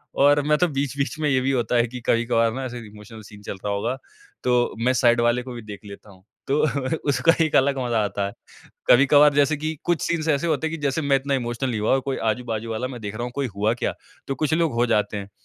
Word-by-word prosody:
और 145 +1 +4
मैं 150 +1 +2
तो 180 - +2
बीच-बीच 140 +1 -2
में 150 -2 +1
ये 130 -1 +2
भी 135 +1 0
होता 120 -2 0
है 120 0 +3
कि 125 +1 -8
कभी-कभार 115 -1 +2
ना 135 +1 -4
ऐसे 120 -1 -6
इमोशनल 105 +1 -12
सीन 105 0 -14
चल - - -5
रहा 100 - 0
होगा। 115 +6 -2 0.5
तो 125 -1 +2
मैं 130 - +3
साइड 120 -2 +3
वाले 120 +1 +2
को 125 -1 -8
भी 120 - -7
देख 105 -3 -9
लेता 100 +1 -12
हूँ, 95 0 -19 0.2
तो 140 +2 +1 0.5
उसका 165 +4 +4
एक 155 - -2
अलग 135 0 +3
मज़ा 115 -3 +1
आता 100 0 -2
है। 100 - -8 0.6
कभी-कभार 145 +3 +6
जैसे 145 +1 +2
की 155 +1 -3
कुछ 175 -2 0
सीन्स 165 -2 -1
ऐसे 150 +3 +1
होते 160 -1 0
हैं 165 - -4
कि - - -13
जैसे 140 +3 0
मैं 140 -1 +2
इतना 140 +1 -1
इमोशनल 120 0 -2
नहीं 110 -3 -2
हुआ 105 - +1
और 135 - +4
कोई 135 - -1
आजू-बाजू 115 -1 -4
वाला 125 +3 -2
मैं 125 -3 -8
देख 105 0 -6
रहा 120 - -4
हूँ 125 - -4
कोई 140 -2 -1
हुआ 105 +3 +1
क्या? 120 - -2 0.3
तो 135 - -2
कुछ 155 0 -1
लोग 160 -4 +1
हो 120 +1 +2
जाते 105 -3 0
हैं 100 0 -7
125 Hz, 255 wpm, -23 LUFS, 115-140 Hz, 0.6 s, कभी-कभार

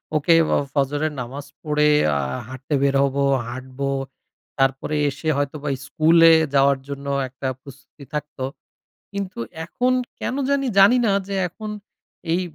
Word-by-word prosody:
"ওকে, 155 +3 +4 0.2
অ - - +4 0.2
ফজরের 145 +2 0
নামাজ 135 +4 -7 0.2
পড়ে 150 0 +2 0.3
আ - - 0 0.3
হাঁটতে 130 +3 -6
বের 140 0 +2
হবো, 140 0 0 0.2
হাঁটব।" 130 +2 -8 0.8
তারপরে 135 +3 +1
এসে 150 +3 -4
হয়তোবা 145 +1 -2 0.2
স্কুলে 165 +2 +5 0.2
যাওয়ার 140 0 +4
জন্য 140 0 -6 0.2
একটা 130 +1 -6
প্রস্তুতি 140 +1 -14
থাকত। 150 0 -5 0.8
কিন্তু 200 -2 -5 0.3
এখন 250 +8 0 0.3
কেনো 265 +3 -2
জানি 280 -1 +1
জানিনা, 225 +2 +6 0.2
যে 200 - -3
এখন 215 +5 -8 0.6
এই 175 - +2
145 Hz, 130 wpm, -22 LUFS, 140-170 Hz, 0.8 s, জানিনা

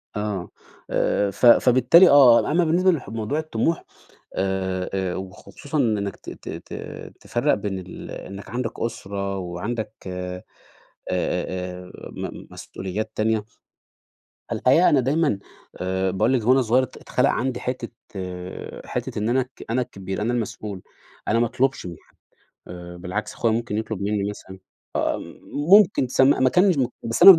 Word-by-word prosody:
آه، 105 -4 -3 0.4
آآ 100 -1 +1
ف 110 - -1
فبالتالي 130 +9 +7
آه، 135 -2 +7
أمّا 175 +2 +3
بالنسبة 180 +4 +4
لح 140 - -3
لموضوع 115 +7 -2
الطموح 155 +1 -1 0.5
آآ، 95 -1 -1
آآ 95 -2 -1
وخصوصًا 95 +10 -6
من 115 -6 +2
إنك 100 -1 -3
ت - - -10
ت - - -9
ت - - -8 0.5
تفرّق - - +1
بين 95 -2 -2
ال 90 0 -9
إنك 100 +1 -8
عَندك 120 -1 -3
أُسرة 100 -4 -3
وعَندك 95 +6 -4
أ 90 0 -4 0.7
أ 90 0 -2
أ 90 - -12 0.2
م - - -7
مسؤوليات 105 +4 -5
تانية، 110 0 +1 1.1
الحقيقة 160 +8 +4
أنا 140 - +4
دايمًا 140 -4 +1 0.4
آآ 95 +1 -1
باقول 105 +7 +2
لِك 120 -4 +1
وأنا 130 +1 +6
صغيّر 125 +2 +3
ات 130 - -7
اتخلَق 125 +2 +1
عندي 130 -1 -1
حتّة 125 -2 -3 1.0
حتّة - - -3
إن 110 +2 0
أنا 130 +2 +3
الك 130 0 -9
أنا 125 +3 +1
الكبير، 95 -3 -5
أنا 120 +3 0
المسؤول، 110 -4 -4 0.5
أنا 115 - +3
ما 120 - +4
اطلُبش 130 -2 0
من 85 -2 -6
حد - - -30 0.5
آآ، 90 0 -8
بالعكس 90 +5 -4
أخويا 115 -2 +1
ممكن 115 -2 -2
يطلُب 110 -3 -4
مني، 100 0 0
مثلًا 95 -2 -10 0.4
آه، - - +1 0.5
ممكن 200 -9 +7
تسم 130 +1 +4
ما 130 - +5
كانش 180 -1 +4
م 130 - +3 0.2
بس 115 - -1
أنا 195 - +14
ما 165 - +3
110 Hz, 160 wpm, -23 LUFS, 95-130 Hz, 1.1 s, أنا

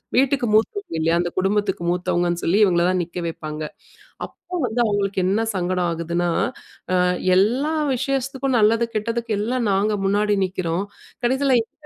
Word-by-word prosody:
வீட்டுக்கு 265 0 +2
மூத்தவங்க 315 - 0
இல்லயா! 165 +1 +2
அந்த 175 0 0
குடும்பத்துக்கு 195 -1 0
மூத்தவங்கன்னு 175 -1 0
சொல்லி, 180 +4 +2
இவங்கள 175 -4 +3
தான் 185 0 +1
நிக்க 175 +1 -5
வைப்பாங்க. 155 -1 -6 0.6
அப்போ 360 - -10
வந்து 240 -1 -1
அவுங்களுக்கு 200 -2 0
என்ன 200 +4 +1
சங்கடம் 180 -1 0
ஆகுதுன்னா, 170 +1 -1 0.7
அ - - +4 0.3
எல்லா 245 +11 +2 0.2
விசேஷத்துக்கும் 265 0 -1
நல்லது 225 +2 +3
கெட்டதுக்கு 230 +1 -1
எல்லாம் 235 +2 -1
நாங்க 205 +2 +1
முன்னாடி 205 +1 +2
நிக்கிறோம். 185 0 -2 0.4
கடைசில 265 +1 +3
எங்க 225 - -11
205 Hz, 140 wpm, -22 LUFS, 175-240 Hz, 0.7 s, அ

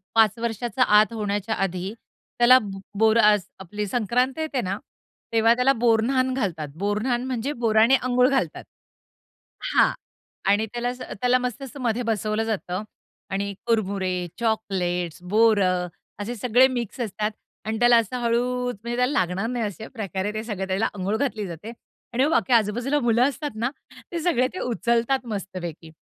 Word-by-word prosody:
5 220 -1 +5
वर्षाचा 235 +1 0 0.2
आत 215 +2 +2
होण्याच्या 205 0 -2
आधी 190 +1 -2 0.5
त्याला 250 +2 +8 0.4
बोर 220 +1 +5
असं 210 -4 +4 0.2
आपली 210 +3 -4
संक्रांत 245 +5 0
येते 305 -5 -1
ना. 195 -1 -2 0.6
तेव्हा 225 +1 +5
त्याला 250 +2 +3
बोरन्हांन 245 +2 +2
घालतात. 180 - -2
बोरन्हांन 215 +5 0
म्हणजे 260 +3 -2
बोरानी 220 +3 +5
अंघोळ 250 0 +3
घालतात 265 - -1 1.1
हां - - +5 0.6
आणि 210 +2 +2
त्याला 240 0 -1
अस 250 +1 -6
त्याला 250 +2 +1
मस्त 250 +1 -4
मस्तमध्ये 245 -3 -2
बसवलं 220 -1 0
जातं 205 -3 -3 0.5
आणि 200 +1 -2
कुरमुरे, 190 -5 0
चॉकलेट्स, 180 -7 -1
बोरं 190 -3 +3 0.3
असे 220 +4 -4
सगळे 245 +3 +4
मिक्स 245 -1 -4
असतात 215 -1 -2 0.3
आणि 220 0 -2
त्याला 240 0 +6
असं 230 +2 0
हळूच 245 +1 0
म्हणजे 235 +1 -3
त्याला 250 +2 +2
लागणार 185 +4 0
नाही 240 -2 -1
अशा 210 +2 -6
प्रकारे 200 -3 -3
ते 215 0 -3
सगळे 205 -4 -4
त्याला 190 +3 +1
अंघोळ 200 +3 -1
घातली 225 -6 -2
जाते 180 +6 -8 0.4
आणि 255 +3 +3
मग 310 - 0
बाकी 270 -6 +2
आजू-बाजूला 235 +6 +2
मुलं 240 -2 +3
असतात 290 +1 -5
ना 240 - +2 0.4
ते 340 - -2
सगळे 255 -8 +2
ते 370 - -5
उचलतात 235 +2 0
मस्तपैकी. 180 -6 -6
225 Hz, 150 wpm, -24 LUFS, 200-245 Hz, 1.1 s, त्याला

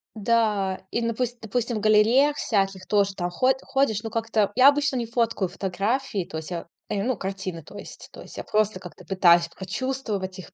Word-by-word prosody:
Да. 210 -3 +1
И, 235 - -1
напуст 235 +1 -2
допустим, 230 +1 -2
в - - -2
галереях 230 +7 +4
всяких 195 -3 -1
тоже 200 -2 +2
там 175 -2 -2
ход 255 +9 +2
ходишь. 270 -6 +1
Ну, 225 - -4
как-то 225 -3 0
я 255 +2 +7
обычно 285 -1 +1
не 235 - -1
фоткаю 230 -4 0
фотографии. 195 +3 -2
То 160 - -7
есть 160 +2 -7
я, 170 -1 -5 0.2
э, 200 - -1
ну, 255 +3 0
картины 190 -4 -5
то - - -12
есть. - - -11
То - - -11
есть - - -12
я - - -4
просто 215 -2 0
как-то 175 -4 -12
пытаюсь 175 -3 +4
прочувствовать 200 -2 -4
их, 185 - -11
210 Hz, 195 wpm, -25 LUFS, 190-235 Hz, 0.2 s, я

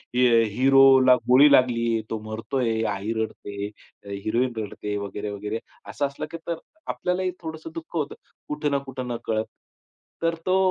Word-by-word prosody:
हे 120 -2 +5
हिरोला 130 +2 +6
गोळी 140 +4 +8
लागली, 115 -4 +3
तो 110 - -2
मरतोय, 115 0 -1
आई 100 +3 -3
रडते, 105 -2 -4 0.4
अ, 100 - -11
हिरोइन 110 +5 -1
रडते 105 -1 -4
वगैरे, 100 +1 -4
वगैरे 105 +2 -4 0.3
असं 145 - -1
असलं, 140 +2 -6
की 165 - -5
तर 170 - -1 0.3
आपल्यालाही 185 0 -1
थोडंसं 160 0 -7
दुःख 165 +1 -8
होतं 150 -2 -2 0.3
कुठं 150 -1 -1
ना 140 - +3
कुठं, 130 -1 -5
न 120 - -2
कळत. 110 -1 0 0.8
तर 165 0 +2
तो 185 - +4
125 Hz, 155 wpm, -25 LUFS, 110-140 Hz, 0.8 s, गोळी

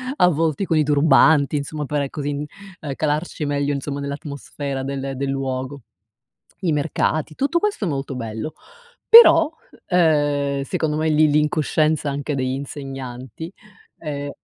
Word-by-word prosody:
avvolti 165 - +2
con 165 -3 +1
i 155 - +4
turbanti 145 0 +4
insomma 150 +1 -4
per 140 -1 -2
così, 145 -1 -4 0.5
ehm, 145 -3 -5
calarci 155 0 -2
meglio 145 0 -1
insomma 140 +1 -4
nell'atmosfera 140 -1 -5
del 135 0 -4
del 140 0 -2
luogo. 135 0 -3 0.8
I 165 -4 +1
mercati, 155 +1 -1
tutto 285 - 0
questo 410 - -1
è - - -1
molto 135 -2 -3
bello 115 +4 -5 0.6
però, 390 -9 +8 0.4
uhm, 145 -5 +2
secondo 155 0 -2
me 160 +1 0
lì 155 0 +4
l'incoscienza 150 0 +1
anche 140 +1 -3
degli 130 -1 -1
insegnanti, 135 - -7 0.5
ehm 145 -2 -5
145 Hz, 135 wpm, -21 LUFS, 140-155 Hz, 0.8 s, però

